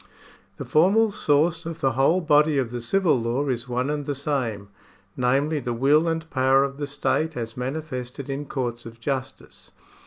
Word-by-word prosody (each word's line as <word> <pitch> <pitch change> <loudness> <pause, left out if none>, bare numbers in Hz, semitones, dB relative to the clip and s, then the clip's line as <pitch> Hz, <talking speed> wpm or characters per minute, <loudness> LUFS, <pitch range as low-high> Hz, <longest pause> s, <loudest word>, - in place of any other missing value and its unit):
The - - -6
formal 205 +8 +4
source 165 -1 +1
of 165 -1 -6
the 135 -3 +2
whole 135 +9 +2
body 150 -2 +3
of 125 -4 -1
the 120 -1 -4
civil 175 +1 +2
law 120 +5 -1
is 125 -1 -3
one 125 +3 -1
and 145 -1 -3
the 145 - -1
same, 125 -8 -2 0.5
namely, 140 +5 +1
the 120 -3 -3
will 145 +7 +3
and 165 -1 -2
power 135 0 +4
of 140 0 -4
the 145 -1 -3
state 150 +2 -1
as 115 -1 -5
manifested 130 -1 -5
in 140 +1 -4
courts 120 -4 -4
of 115 0 -12
justice. 130 +1 -5
140 Hz, 180 wpm, -24 LUFS, 125-155 Hz, 0.5 s, formal